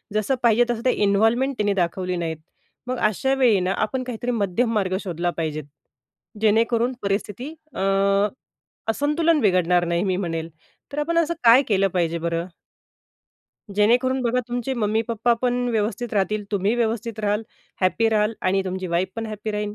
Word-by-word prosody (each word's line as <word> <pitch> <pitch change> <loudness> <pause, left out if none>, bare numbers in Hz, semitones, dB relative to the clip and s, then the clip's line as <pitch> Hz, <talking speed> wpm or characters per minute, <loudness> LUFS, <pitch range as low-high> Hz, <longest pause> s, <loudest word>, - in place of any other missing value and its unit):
जसं 215 +5 +1
पाहिजे 235 +1 +5
तसं 235 0 -2
ते 255 - +5
इन्व्हॉल्वमेंट 225 +7 +2
त्यांनी 205 -1 +1
दाखवली 180 0 -1
नाहीत. 165 -2 -3 0.5
मग 255 - -2
अशावेळी 240 +1 +2
ना 185 +1 0
आपण 235 +5 -1
काहीतरी 245 0 -3
मध्यम 225 +2 0
मार्ग 190 -3 0
शोधला 175 -2 -2
पाहिजे. 155 -2 -2 0.8
जेणेकरून 230 +3 +2
परिस्थिती 205 +7 -3 0.2
अ, - - -5 1.1
असंतुलन 300 +5 +1
बिघडणार 180 -4 +3
नाही, 170 +1 0
मी 190 -2 0
म्हणेल. 165 -3 -3 0.4
तर 290 - -3
आपण 335 +3 0
असं 335 0 +2
काय 235 +3 +8
केलं 195 -2 +3
पाहिजे 170 -2 0
बरं? 170 0 -2 1.3
जेणेकरून 250 +5 +3
बघा 245 +1 +1
तुमचे 245 +2 -2
मम्मी-पप्पा 225 +1 +1
पण 245 0 +1
व्यवस्थित 220 +2 -2
राहतील 210 +1 0
तुम्ही 205 +3 +1
व्यवस्थित 230 -1 -2
राहाल. 210 +1 0 0.4
हॅपी 220 +5 +2
राहाल. 215 0 +1
आणि 190 +1 +1
तुमची 185 0 -3
वाईफ 175 +2 0
पण 225 0 -3
हॅपी 215 0 -5
राहील. 210 0 -3
215 Hz, 150 wpm, -23 LUFS, 185-240 Hz, 1.3 s, काय